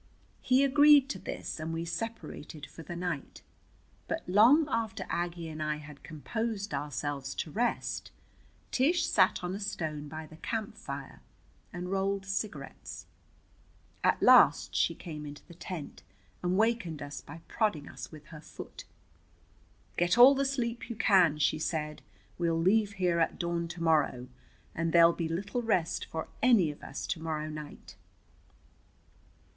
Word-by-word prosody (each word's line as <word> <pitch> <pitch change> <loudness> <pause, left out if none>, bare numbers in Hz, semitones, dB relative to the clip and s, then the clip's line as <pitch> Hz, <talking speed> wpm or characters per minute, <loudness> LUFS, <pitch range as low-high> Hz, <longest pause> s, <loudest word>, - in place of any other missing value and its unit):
He 260 +2 +4
agreed 290 0 +6
to - - -4
this, - - -5
and 160 +1 -4
we 165 +1 -3
separated 170 -6 -6
for 150 +3 -12
the 175 +2 -7
night. 175 -5 -4 0.6
But 325 0 -3
long 235 - +6
after 230 -6 -2
Aggie 170 -1 -2
and 155 -1 -6
I 155 0 0
had 150 -1 -11
composed 200 - -4
ourselves 145 -1 -3
to 155 - -4
rest 235 +6 -1 0.6
Tish 310 +8 +2
sat - - +3
on 180 +1 -2
a 195 - -4
stone 160 -7 -4
by 155 +2 -7
the 155 0 -14
camp 220 +3 -4
fire - - -8 0.5
and 180 +1 -5
rolled 195 0 0
cigarettes. 195 -7 -5 1.0
At - - +2
last - - +6
she - - +2
came 155 -3 -7
into 145 0 -9
the 175 - -13
tent 170 -2 -7 0.4
and 180 +1 0
wakened 215 -9 +1
us 145 0 -7
by 165 +3 -11
prodding 205 -11 0
us - - -9
with 155 -2 -12
her 155 -2 -10
foot. - - -10 1.1
"Get 175 +5 +2
all 250 +3 +10
the 275 0 0
sleep 240 -3 -2
you 235 - -4
can," 180 -8 +4
she 150 +1 +1
said. 150 -1 -3 0.4
"We'll 165 -1 +1
leave 205 +4 +3
here 180 -3 +1
at 165 - +1
dawn 170 -1 -1
to 170 0 -6
morrow, 150 -6 +2 0.4
and 165 0 -1
there'll 170 0 +7
be 165 -2 -3
little 200 +8 -2
rest 185 -8 0
for 160 0 -5
any 225 -11 +5
of 145 - -14
us - - -6
to 165 - -3
morrow 155 -1 -3
night." 150 -1 -9
170 Hz, 155 wpm, -30 LUFS, 155-215 Hz, 1.1 s, all